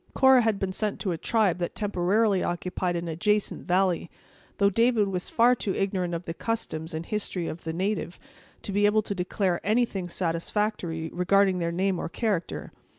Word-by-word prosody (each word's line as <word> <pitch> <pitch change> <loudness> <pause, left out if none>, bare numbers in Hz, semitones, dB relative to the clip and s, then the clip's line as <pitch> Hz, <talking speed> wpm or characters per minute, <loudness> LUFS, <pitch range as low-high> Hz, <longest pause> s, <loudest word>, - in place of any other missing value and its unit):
Cora 265 -1 +6
had 225 -3 +1
been 195 -1 -2
sent 210 +1 -2
to 190 - -1
a 170 - -2
tribe 210 -6 +1
that 175 - -3
temporarily 205 0 +1
occupied 180 0 -2
an 170 0 -3
adjacent 210 +6 -1
valley, 180 -2 +1 0.5
though 200 0 +3
David 230 -1 +3
was 180 -2 -3
far 240 +2 +5
too 210 -5 -2
ignorant 185 -3 -1
of 170 +1 -5
the 165 - -4
customs 160 -7 -4
and 160 +1 -4
history 195 -5 -3
of 165 - -7
the 160 - -2
natives, 185 +1 -2 0.5
to - - -4
be 205 +1 +3
able 215 +1 +3
to 200 - -3
declare 185 -1 -1
anything 210 -4 0
satisfactory 170 -1 -2
concerning 190 +1 +3
their 170 -1 -1
name 185 +1 0
or - - -3
character. 200 -3 -2
190 Hz, 180 wpm, -27 LUFS, 175-210 Hz, 0.5 s, Cora